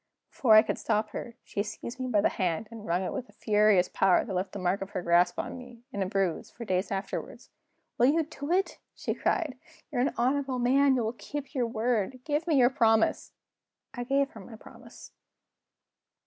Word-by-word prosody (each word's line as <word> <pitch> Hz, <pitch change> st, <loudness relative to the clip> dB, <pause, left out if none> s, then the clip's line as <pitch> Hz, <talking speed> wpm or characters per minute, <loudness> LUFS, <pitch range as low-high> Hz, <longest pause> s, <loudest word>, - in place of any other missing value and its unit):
Before 225 Hz, -5 st, +4 dB
I 215 Hz, -, +9 dB
could -, -, -3 dB
stop 215 Hz, -1 st, 0 dB
her, 235 Hz, +2 st, -6 dB
she 200 Hz, -, -3 dB
seized 235 Hz, +4 st, -6 dB
me 255 Hz, -, -2 dB
by 215 Hz, -5 st, +2 dB
the -, -, +3 dB
hand, 185 Hz, +2 st, -2 dB
and 220 Hz, -2 st, -9 dB
wrung 175 Hz, +2 st, +1 dB
it -, -, -3 dB
with 255 Hz, -2 st, -5 dB
a -, -, -19 dB
furious 210 Hz, -4 st, +3 dB
power 190 Hz, -2 st, +3 dB
that 200 Hz, -, -5 dB
left 185 Hz, +2 st, -2 dB
the -, -, -6 dB
mark 185 Hz, +1 st, 0 dB
of 195 Hz, -, -5 dB
her 180 Hz, -, -3 dB
grasp 175 Hz, +1 st, +3 dB
on -, -, -4 dB
me, 245 Hz, -2 st, -13 dB
in 200 Hz, -, -3 dB
a 190 Hz, -, 0 dB
bruise, 190 Hz, -3 st, -1 dB
for 235 Hz, -, -9 dB
days 185 Hz, -1 st, 0 dB
afterward. 195 Hz, 0 st, -4 dB, 0.6 s
"Will 245 Hz, -, +6 dB
you 320 Hz, +4 st, +3 dB
do 290 Hz, 0 st, -7 dB
it?" 380 Hz, +2 st, +1 dB, 0.2 s
she -, -, -2 dB
cried. 290 Hz, -7 st, -1 dB, 0.3 s
"You're 245 Hz, -, 0 dB
an 265 Hz, -, 0 dB
honorable 265 Hz, +2 st, 0 dB
man; 265 Hz, +3 st, +4 dB
you 245 Hz, -, 0 dB
will 220 Hz, +1 st, -2 dB
keep 290 Hz, +4 st, -7 dB
your 250 Hz, -4 st, 0 dB
word. 230 Hz, +1 st, -1 dB
Give 300 Hz, +3 st, -1 dB
me 320 Hz, -, +3 dB
your 250 Hz, -1 st, +5 dB
promise!" 225 Hz, -4 st, +2 dB, 0.6 s
I 245 Hz, -, -4 dB
gave 275 Hz, +2 st, +1 dB
her 220 Hz, -, -11 dB
my 220 Hz, +4 st, -11 dB
promise. -, -, -14 dB
230 Hz, 210 wpm, -28 LUFS, 200-260 Hz, 0.6 s, I